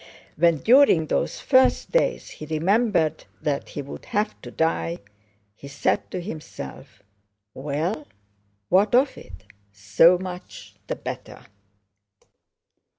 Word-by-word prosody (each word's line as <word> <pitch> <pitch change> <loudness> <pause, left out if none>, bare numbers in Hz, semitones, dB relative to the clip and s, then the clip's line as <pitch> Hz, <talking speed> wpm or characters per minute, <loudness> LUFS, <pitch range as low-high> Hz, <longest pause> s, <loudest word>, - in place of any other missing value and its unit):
When 170 0 +3
during 235 - +5
those - - -1
first 260 -1 +3
days - - 0
he 155 - -9
remembered 170 +1 +1
that 145 -2 -2
he 145 - -6
would 140 - -10
have 210 +1 -1
to - - -9
die, 85 - -1 0.6
he 140 - -12
said 140 +1 -1
to 185 - -4
himself: 155 - -9 0.5
"Well, 150 +4 -3 0.6
what 200 +5 +4
of 265 +3 +3
it? 95 0 -13 0.3
So 105 - +4
much 180 0 -9
the - - -2
better!" - - -8
160 Hz, 115 wpm, -24 LUFS, 140-205 Hz, 0.6 s, during